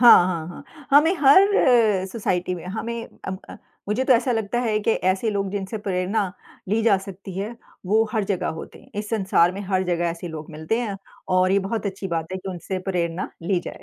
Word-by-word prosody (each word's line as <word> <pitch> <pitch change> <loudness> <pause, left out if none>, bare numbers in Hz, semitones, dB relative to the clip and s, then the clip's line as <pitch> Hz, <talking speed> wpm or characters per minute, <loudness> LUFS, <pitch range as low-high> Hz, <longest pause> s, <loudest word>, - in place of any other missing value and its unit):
हाँ, 235 -7 +9
हाँ, 170 -3 -2
हाँ। 175 - -10 0.3
हमें 300 +6 +6
हर 300 +8 +7 0.7
सोसाइटी 185 -5 -1
में 175 - -8
हमें 230 +4 -4 0.2
अ - - -2 0.2
अ, - - -9 0.3
मुझे 225 +5 +1
तो 260 - +5
ऐसा 245 +1 +3
लगता 225 +1 -1
है 220 -3 +1
कि 215 - +1 0.2
ऐसे 195 +4 0
लोग 200 -2 -1
जिनसे 200 +2 -4
प्रेरणा 190 +1 0 0.4
ली 220 +3 +1
जा 215 -4 +5
सकती 195 -1 -9
है 215 +4 -4 0.3
वो 220 +3 +4
हर 215 -2 +1
जगह 185 -3 -1
होते - - -9
हैं। - - -19
इस 210 - -4
संसार 190 -5 +3
में 195 - -6
हर 190 -1 +2
जगह 175 -1 0
ऐसे 170 +1 -5
लोग 155 -1 -7
मिलते 160 +8 -2
हैं 210 -5 -3 0.4
और 185 0 +4
ये 200 - +4
बहुत 200 +2 -2
अच्छी 195 0 -4
बात 165 +1 -3
है 185 - -2
कि 190 - -8
उनसे 185 +1 -4
प्रेरणा 175 -1 -1
ली 175 +2 +1
जाए।। - - -8
195 Hz, 215 wpm, -23 LUFS, 180-225 Hz, 0.7 s, हाँ